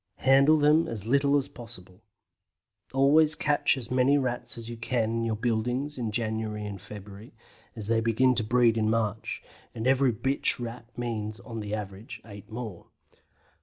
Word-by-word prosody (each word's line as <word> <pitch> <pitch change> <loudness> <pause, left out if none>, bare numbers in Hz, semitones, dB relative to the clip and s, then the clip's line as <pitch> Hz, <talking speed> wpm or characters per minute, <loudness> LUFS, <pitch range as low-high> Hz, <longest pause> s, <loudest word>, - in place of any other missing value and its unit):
Handle 140 +4 +6
them 150 +2 +4
as 110 -3 -5
little 140 +3 +3
as 140 - -1
possible. 100 -5 -11 0.9
Always 150 +3 +5
catch 145 -1 +2
as 120 -2 -6
many 130 +3 +3
Rats 125 -3 -1
as 115 -1 -7
you 120 - -6
can 115 -1 -1
in 115 0 -1
your 115 -1 -1
buildings 120 +6 -1
in 120 -3 -3
January 110 -1 -3
and 100 -3 -7
February, 105 +2 -11 0.4
as 110 -3 -3
they 115 +1 +2
begin 115 +3 +3
to 115 -2 +1
breed 115 0 +3
in 110 0 +1
March, 110 -1 -2 0.3
and 110 - -4
every 130 0 +3
bitch 135 +4 +1
Rat 120 -1 -7
means, 110 -3 -4
on 115 +2 -7
the 105 0 -3
average, 100 +1 -7
eight 100 -2 -12
more. 110 -6 -7
115 Hz, 165 wpm, -27 LUFS, 110-130 Hz, 0.9 s, Handle